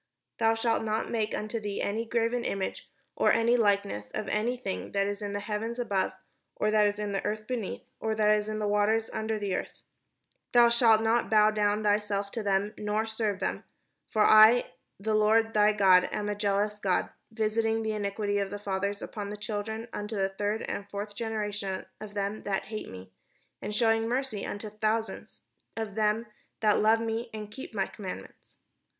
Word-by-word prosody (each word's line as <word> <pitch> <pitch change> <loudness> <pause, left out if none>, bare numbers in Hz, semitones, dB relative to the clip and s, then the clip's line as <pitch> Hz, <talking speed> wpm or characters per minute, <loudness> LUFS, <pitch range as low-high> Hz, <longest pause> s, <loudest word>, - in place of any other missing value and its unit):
" - - -58
Thou 225 0 +4
shalt 225 0 +1
not 220 0 -1
make 220 -2 -1
unto 215 +2 -3
thee 205 -2 -4
any 220 +3 -1
graven 235 +1 0
image, 195 -4 -3 0.3
or - - +3
any 230 +1 +3
likeness 200 - +1
of 215 - -3
any 235 +4 0
thing 200 -6 -5
that 200 0 +2
is 205 +1 -3
in 205 -1 -4
heaven 220 +3 -3
above, 200 -7 0 0.4
or 215 - +1
that 210 -1 +5
is 205 0 -2
in 210 -1 -3
the 195 - -2
earth 215 +1 -3
beneath, 230 -4 -4 0.2
or 220 0 -1
that 210 -1 +3
is 210 0 +1
in 215 - -2
the 210 -1 -1
water 210 +2 +3
under 220 0 -1
the 200 -2 -2
earth: - - -5 0.7
Thou 240 -1 +7
shalt 230 -2 +5
not 230 +2 +2
bow 215 -1 +5
down 210 0 +1
thyself 205 -1 0
to 230 - -3
them, 200 0 0
nor 210 +1 0
serve 220 -3 -1
them: - - -2 0.5
for 215 - +3
I 220 +3 +7 0.3
the 215 +2 -1
Lord 220 +1 +3
thy 210 0 +5
God 190 -3 +5
am 210 -1 -2
a - - 0
jealous 205 0 0
God, 190 -3 0 0.2
visiting 225 0 0
the 220 - -1
iniquity 205 0 -1
of 200 -1 -1
the 205 - -5
fathers 200 0 -2
upon 205 -2 -5
the 210 - -6
children 215 +2 -4
unto 210 +1 -4
the 195 -1 +1
third 205 +3 -2
and 200 0 -5
fourth 205 +1 -5
generation 205 -3 -3
of 210 -1 -9
them 200 +1 -2
that 195 -1 -1
hate 215 - -5
me; 95 0 -10 0.5
and 210 +1 -4
shewing 225 0 +3
mercy 250 -4 -2
unto 210 +1 -5
thousands 220 +1 -2 0.3
of 220 -3 -3
them 215 +2 +1 0.4
that 210 -1 +4
love 220 +1 +5
me, 230 +1 -2
and 210 -1 -7
keep 250 -1 -9
my 195 -2 +1
commandments. 190 -3 -9
210 Hz, 190 wpm, -29 LUFS, 205-225 Hz, 0.7 s, Thou